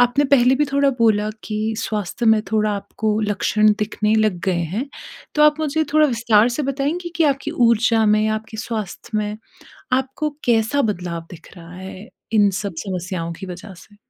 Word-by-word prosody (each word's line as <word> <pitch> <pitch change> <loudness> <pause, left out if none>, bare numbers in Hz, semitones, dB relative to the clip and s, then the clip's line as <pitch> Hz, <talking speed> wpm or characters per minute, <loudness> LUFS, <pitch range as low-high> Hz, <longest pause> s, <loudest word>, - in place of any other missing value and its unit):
आपने 245 +4 +3
पहले 260 -2 +4
भी 295 +2 +2
थोड़ा 280 0 +3
बोला 215 -2 +3 0.2
कि 215 +1 -2
स्वास्थ्य 220 +2 -3
में 220 -1 +5
थोड़ा 215 -1 +2
आपको 210 +2 -2
लक्षण 210 0 +2
दिखने 215 0 0
लग 215 -5 +2
गए 180 -3 +1
हैं, 210 - -3 0.5
तो 300 - +3
आप 300 +1 +4
मुझे 315 +1 0
थोड़ा 305 0 +5
विस्तार 235 -3 +3
से 270 +5 -2
बताएँगी 285 +6 -2
कि 330 - +3
आपकी 275 -2 0
ऊर्जा 230 -1 +3
में 210 0 +4
या 215 0 +1
आपके 220 0 -7
स्वास्थ्य 215 0 -4
में 210 0 -3 0.6
आपको 265 +4 -1 0.2
कैसा 235 +4 +2
बदलाव 175 -6 -3
दिख 175 - -13
रहा 170 +1 -12
है 190 +3 -9 0.3
इन 205 -2 +5
सब 200 -4 -4
समस्याओं 180 -2 -4
की 190 - -6
वज़ह 185 +2 -9
से। 205 +5 -17
220 Hz, 180 wpm, -20 LUFS, 205-255 Hz, 0.6 s, में